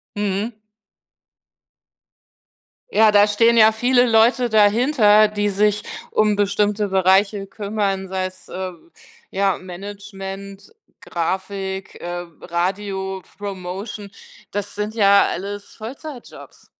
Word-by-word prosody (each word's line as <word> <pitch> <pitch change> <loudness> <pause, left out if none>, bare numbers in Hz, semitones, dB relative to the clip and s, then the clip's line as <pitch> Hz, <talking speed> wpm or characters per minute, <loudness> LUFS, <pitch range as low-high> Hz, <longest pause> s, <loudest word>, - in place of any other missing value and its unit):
Mhm. 205 +2 -2 2.4
Ja, 220 - +5
da 205 0 +6
stehen 230 +3 +3
ja 220 0 +7
viele 245 +3 +3
Leute 235 +2 +3
dahinter, 215 0 +5
die 205 0 -1
sich 210 +1 +1 0.3
um 215 -1 +2
bestimmte 205 +1 +1
Bereiche 195 +2 +2
kümmern, 200 -2 -2
sei 190 0 -2
es, 185 0 -10
äh, 185 0 -4 0.6
ja, 195 -1 +1
Management, 195 - -9 0.3
Grafik, 190 +2 -4
äh, 175 0 -5 0.2
Radiopromotion. 190 +2 -4 0.4
Das 205 0 -4
sind 210 +1 -3
ja 200 -2 +5
alles 200 +2 -6
Vollzeitjobs. 255 +4 -10
205 Hz, 95 wpm, -21 LUFS, 190-215 Hz, 2.4 s, ja